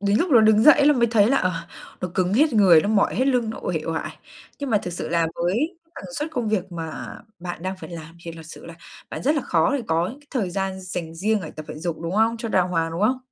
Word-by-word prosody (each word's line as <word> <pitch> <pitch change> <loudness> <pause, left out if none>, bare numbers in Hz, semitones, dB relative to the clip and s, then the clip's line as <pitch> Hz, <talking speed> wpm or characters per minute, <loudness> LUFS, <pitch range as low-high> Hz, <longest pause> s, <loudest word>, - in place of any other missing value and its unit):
đến 200 +1 +2
lúc 350 - 0
nó 240 -5 +7
đứng 215 0 +5
dậy 290 0 +7
là 295 - +7
mới 235 -3 +2
thấy 215 -3 +4
là, 275 - +3
ờ, 185 -7 +1 0.5
nó 180 - -2
cứng 185 0 +1
hết 295 +2 +3
người, 185 -7 +6
nó 205 - -2
mỏi 210 -2 +2
hết 260 - +1
lưng, 245 -4 +1
nó - - -7
uể 170 -3 -1
oải. 165 0 -4 0.4
Nhưng 280 -3 -4
mà 210 - +4
thực 180 - -6
sự - - -5
là 170 -1 +1
với 230 - -1 0.2
tần - - -9
suất 300 +3 -3
công 245 -8 -2
việc 195 -3 -1
mà 165 -2 -6 0.2
bạn 175 -1 -7
đang 190 +1 -3
phải - - -9
làm 165 0 -9
thì 165 - -6
thật 165 0 -10
sự 165 - -11
là 165 - -9 0.4
bạn - - -6
rất 295 +4 +2
là 290 - 0
khó 165 -4 +1
để 255 - -4
có 165 +2 +1
những 270 +5 -10
cái 290 - -24
thời 215 -9 -1
gian 190 +1 -3
dành 180 -3 -6
riêng 210 +5 0
để 160 - -7
tập 155 - -9
thể - - -6
dục, 170 -1 -3
đúng 170 +2 -4
không? 225 +2 +2
Cho 230 0 -5
đàng 185 -3 +2
hoàng, 165 -2 0
đúng 170 - -4
không? 255 +4 +2
195 Hz, 285 wpm, -23 LUFS, 170-235 Hz, 0.5 s, nó